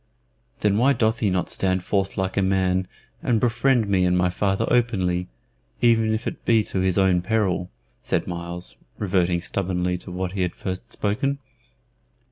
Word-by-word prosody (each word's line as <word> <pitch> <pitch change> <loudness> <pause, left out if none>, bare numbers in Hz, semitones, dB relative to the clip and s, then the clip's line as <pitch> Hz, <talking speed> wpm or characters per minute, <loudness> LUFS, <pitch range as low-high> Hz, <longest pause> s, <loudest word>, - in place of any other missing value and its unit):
"Then 105 0 +2
why 135 +4 +4
doth 115 -1 +1
he 105 - +2
not 90 -2 0
stand 95 -1 0
forth 95 -1 -1
like 95 -1 -1
a 100 - +2
man 95 -1 +1 0.3
and 115 -3 +1
befriend 120 0 +2
me 95 -2 +2
and 90 0 +3
my 90 0 +2
father 95 +3 0
openly, 95 -7 +1 0.5
even 115 -2 +3
if 110 +2 -2
it - - -5
be 115 -2 +3
to 95 - -3
his 95 0 +1
own 95 -2 +3
peril?" 95 -3 0 0.3
said - - -1
Myles, 85 -6 -6 0.2
reverting 90 -3 +1
stubbornly 90 -1 -1
to - - -9
what 90 0 -3
he 95 0 -3
had 90 -1 -1
first 95 +5 -5
spoken. 135 +7 -1
95 Hz, 170 wpm, -24 LUFS, 90-110 Hz, 0.5 s, why